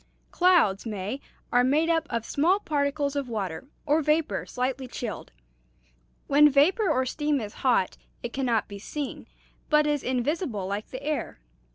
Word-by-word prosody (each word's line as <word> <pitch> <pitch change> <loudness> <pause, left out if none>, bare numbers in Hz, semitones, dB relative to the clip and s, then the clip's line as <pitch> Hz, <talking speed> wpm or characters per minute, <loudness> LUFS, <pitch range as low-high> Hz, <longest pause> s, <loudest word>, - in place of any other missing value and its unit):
"Clouds, 335 - +3
May, 210 +5 -4 0.3
are 245 0 +4
made 295 +6 +3
up 325 -2 +1
of 230 -1 -2
small 345 +8 +2
particles 285 -4 -1
of 280 -3 -2
water 200 -1 -4 0.2
or 300 +3 +3
vapor 305 +1 0
slightly 255 +1 -2
chilled. 235 -3 -6 0.9
When 295 +1 +6
vapor 335 - +3
or 260 -4 +2
steam 295 +2 0
is 210 -3 -6
hot, 240 -8 +2 0.3
it 240 - -5
can 270 -1 -1
not 225 -3 +1
be 200 -1 -8
seen, 285 +6 -5 0.4
but 300 0 +4
is 295 -2 +1
invisible 255 - -1
like 200 +2 -3
the 260 +1 -8
air. 300 - -3
275 Hz, 160 wpm, -27 LUFS, 235-300 Hz, 0.9 s, When